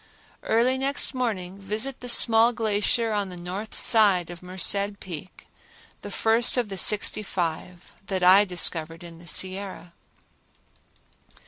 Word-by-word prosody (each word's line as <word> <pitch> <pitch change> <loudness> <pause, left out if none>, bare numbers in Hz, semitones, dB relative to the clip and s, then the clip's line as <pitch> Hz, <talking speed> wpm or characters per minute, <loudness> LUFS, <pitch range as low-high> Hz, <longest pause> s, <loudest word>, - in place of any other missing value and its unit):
Early 250 +3 +1
next 275 +1 0
morning 200 -7 -4
visit 215 +7 -4
the 245 - -5
small 230 0 +6
glacier 220 +1 -1
on 205 -2 -2
the 180 - -10
north 185 +5 -7
side 200 -7 +3
of 175 - -11
Merced 200 +2 -1
Peak, 180 0 -10 0.6
the - - -8
first 225 +3 +1
of 240 -4 -1
the 195 - -6
sixty 210 +2 +1
five 175 -2 -5
that 190 -2 -3
I 190 +3 +6
discovered 165 -3 -2
in 165 -1 -12
the 170 - -15
Sierra. 185 0 -1
200 Hz, 135 wpm, -24 LUFS, 180-225 Hz, 0.6 s, small